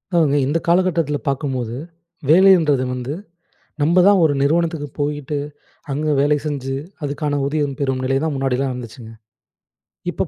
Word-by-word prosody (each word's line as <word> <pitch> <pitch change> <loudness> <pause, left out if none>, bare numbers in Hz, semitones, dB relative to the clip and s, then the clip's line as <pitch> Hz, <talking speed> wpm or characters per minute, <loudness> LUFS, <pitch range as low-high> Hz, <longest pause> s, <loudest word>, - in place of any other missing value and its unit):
அதாங்க 150 -4 +3
இந்த 150 +4 0
காலகட்டத்துல 170 -4 +2
பார்க்கும்போது, 130 -4 -2 0.5
வேலைன்றது 165 -6 +5
வந்து 125 +3 -4 0.7
நம்ப 165 +5 +3
தான் 200 -2 +5
ஒரு 155 -3 +3
நிறுவனத்துக்கு 160 +1 +1
போயிட்டு, 145 0 -2 0.6
அங்க 150 +3 -2
வேலை 145 +1 +3
செஞ்சு, 135 -3 -3 0.3
அதுக்கான 145 0 -2
ஊதியம் 145 -1 -1
பெறும் 135 -2 -1
நிலை 135 +1 +1
தான் 160 - -1
முன்னாடிலாம் 135 0 0
இருந்துச்சுங்க. 120 -2 -9 1.0
இப்ப - - -2
145 Hz, 130 wpm, -20 LUFS, 135-155 Hz, 1.0 s, வேலைன்றது